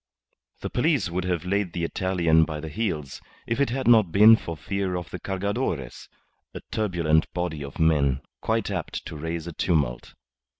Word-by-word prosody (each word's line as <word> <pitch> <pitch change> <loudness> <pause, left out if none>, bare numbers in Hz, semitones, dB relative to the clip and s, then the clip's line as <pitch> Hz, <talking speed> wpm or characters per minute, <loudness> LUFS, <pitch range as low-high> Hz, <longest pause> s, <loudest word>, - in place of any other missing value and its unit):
The - - -4
police 130 - +1
would 90 +1 -2
have 90 -2 -1
laid 100 -1 -1
the 85 - -3
Italian 85 -2 +2
by 75 -1 -3
the 80 +1 -6
heels 75 -8 -3 0.2
if 115 - -2
it 140 - +2
had 130 +1 -2
not 110 -7 +6
been 105 +5 +8
for 85 -7 -6
fear 95 +1 -2
of 90 -3 -5
the - - -5
Cargadores, 95 - -3 0.5
a - - -6
turbulent 85 -7 +1
body 85 -4 -3
of 70 0 -9
men, 70 -4 +2 0.2
quite 110 -2 0
apt 95 -5 -4
to - - -7
raise 80 +2 -4
a 85 - -6
tumult. 75 -9 -1
90 Hz, 175 wpm, -25 LUFS, 80-100 Hz, 0.5 s, been